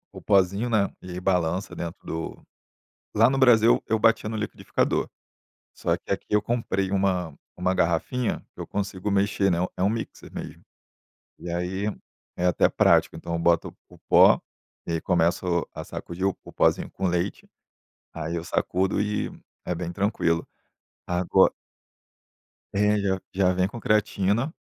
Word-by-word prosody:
o - - -8
pozinho, 100 +4 +2
né, 105 -3 +1
e 90 - -10
ai 90 +1 -5
balança 90 0 0
dentro 85 0 -6
do 80 0 -5 0.7
lá 115 +2 +6
no - - 0
Brasil 120 -3 +5
eu 110 0 +2
batia 110 0 +3
no 110 - -3
liquidificador, 105 0 -1 0.7
só - - 0
que - - -23
aqui - - -5
eu 105 0 +3
comprei 105 -5 -1
uma 90 -6 0 0.2
uma 90 +1 +1
garrafinha 90 +8 0
que - - -9
eu - - -5
consigo 100 0 -3
mexer, 100 -1 +2
né, 85 - +1 0.2
é 90 - -1
um 100 - +4
mixer 115 +1 -5
mesmo. - - -8 0.8
E 90 - -7
aí 90 +4 -2 0.5
é 90 - 0
até 90 - +3
prático, - - +3
então 85 - -6
eu 85 - -1
boto 85 0 +1
o - - -16
pó - - +7 0.5
e - - -4
aí 80 - -1
começo 85 0 +1
a - - -6
sacudir 90 +3 -5
o 95 - -1
o - - -12
pozinho - - +2
com 95 -1 -2
leite, 90 +2 -2 0.7
aí 80 +1 -3
eu 85 - -3
sacudo 95 +2 0
e 105 0 -1 0.4
é 90 - -1
bem 85 0 -4
tranquilo. 85 -4 0 0.6
Ago 90 0 +3 1.2
É 105 +1 +3
já 95 -1 0
já 95 -1 +3
vem 90 +1 +1
com 115 +3 -8
creatina, 105 - +1
95 Hz, 160 wpm, -25 LUFS, 90-105 Hz, 1.2 s, pó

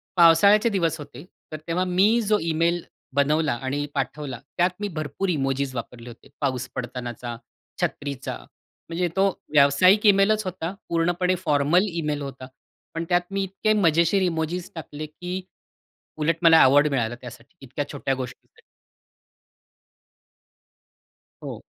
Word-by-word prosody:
पावसाळ्याचे 200 +6 +6
दिवस 170 -5 0
होते. 145 +2 -10 0.3
तर 155 - -4
तेव्हा 175 +2 0
मी 200 +6 +3
जो 210 0 +2
ईमेल 165 +1 +1 0.3
बनवला 150 +3 +2
आणि 145 +2 -2
पाठवला 135 -2 -4 0.2
त्यात 175 +1 +4
मी 205 - -2
भरपूर 155 +6 -3
इमोजीस 135 -4 -1
वापरले 120 0 -7
होते. 115 - -15
पाऊस 130 -2 -1
पडतानाचा, 120 -1 -5 0.5
छत्रीचा. 140 - -3 0.5
म्हणजे 175 +1 -1
तो 195 +1 +3 0.2
व्यावसायिक 155 +9 +5
ईमेलच 205 +2 +4
होता. 185 -1 -4 0.2
पूर्णपणे 175 +2 +1
फॉर्मल 150 +7 +3
ईमेल 150 -4 -2
होता. 135 -2 -7 0.5
पण 165 - -3
त्यात 175 0 +3
मी 195 0 -1
इतके 195 +3 0
मजेशीर 170 0 +3
इमोजीस 175 0 -2
टाकले, 155 -1 -7
की 180 +4 -6 0.8
उलट 155 +1 +1
मला 165 -1 +7
अवॉर्ड 145 +3 +5
मिळाला 120 -3 -1
त्यासाठी 125 +5 -12
इतक्या 140 +2 -5
छोट्या 140 -2 -2
गोष्टीसाठी. 130 -2 -9 2.8
हो. - - -7
160 Hz, 125 wpm, -24 LUFS, 140-180 Hz, 2.8 s, मला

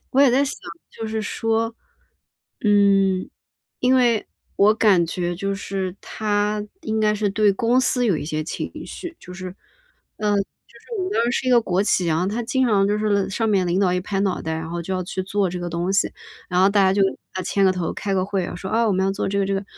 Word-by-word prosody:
我 270 - +3
也 280 -3 +6
在 270 +3 +4
想， 285 - -4 0.3
就 225 - -6
是 220 0 -2
说， 225 +2 -1 0.9
嗯， 195 -2 +3 0.5
因 255 +1 +3
为 240 -4 +2 0.3
我 210 +2 +5
感 200 -6 +4
觉 175 0 -3
就 195 +2 -2
是 195 -2 -4
他 210 0 -1 0.2
应 220 0 -2
该 215 0 +3
是 210 -1 0
对 205 0 +3
公 235 +5 +2
司 250 -1 +1
有 185 -8 +2
一 145 - -5
些 155 0 -2
情 - - -4 0.2
绪， 345 -2 -8
就 180 - -12
是 185 0 -7 0.6
呃， 210 -1 0
就 200 - +3
是 - - -16
我 375 - -1
们 375 - -3
当 230 - +2
时 240 - +1
是 255 - -4
一 - - +3
个 240 -1 +6
国 190 -2 0
企， 185 -4 +1
然 160 -1 +1
后 180 - 0
他 215 +5 -2
经 260 +3 +1
常 200 -3 +3
就 210 +1 +1
是 215 - -1
了 200 -1 +1
上 225 +3 -1
面 190 -4 +2
领 180 +3 +1
导 185 -2 +2
一 180 - 0
拍 195 +1 -2
脑 195 -2 0
袋， 160 0 -3
然 160 0 -5
后 170 0 -3
就 190 - -6
要 185 -1 -2
去 185 - -4
做 195 +1 0
这 180 0 -5
个 175 - -4
东 175 +3 -2
西。 195 - +2 0.4
然 180 0 +1
后 190 - +6
大 200 0 +3
家 190 - +4
就 195 0 +3 0.3
要 185 - -2
牵 195 +2 +1
个 190 - +5
头、 180 -2 -3
开 200 -2 -3
个 185 - +1
会， 195 -3 -2
说： 190 +2 -7
“啊， 230 0 +2
我 - - +2
们 190 0 +1
要 195 - +1
做 - - -2
这 200 - -1
个 195 - +2
这 195 - -1
个。” 195 - -1
200 Hz, 270 characters per minute, -22 LUFS, 185-220 Hz, 0.9 s, 也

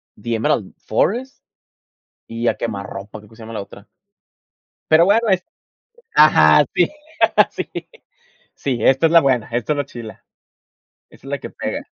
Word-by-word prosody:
The 120 -1 -3
Emerald 110 -3 -1
Forest, 245 - -2 0.8
y 115 +1 -2
A 110 - 0
Quemarropa, 100 -2 -6
creo 105 +2 -19
que 110 - -18
se 115 - -13
llama 110 +1 -9
la 105 - -4
otra. 100 +1 -15 1.0
Pero 160 +2 +6
bueno 225 +3 +3
es 185 -2 +2 0.7
Ajá. 80 - +6
Sí, 175 - +2 0.6
sí, - - -5 0.9
sí, 130 -4 -2
esta 135 +6 +4
es - - -3
la 170 - +8
buena, 130 -5 +1
esta 120 +6 -1
es 145 - -6
la 145 - -1
chila. 115 -3 -11 0.9
Esa - - -18
es - - -8
la - - -2
que - - -9
pega. - - -5
120 Hz, 160 wpm, -19 LUFS, 110-155 Hz, 1.0 s, la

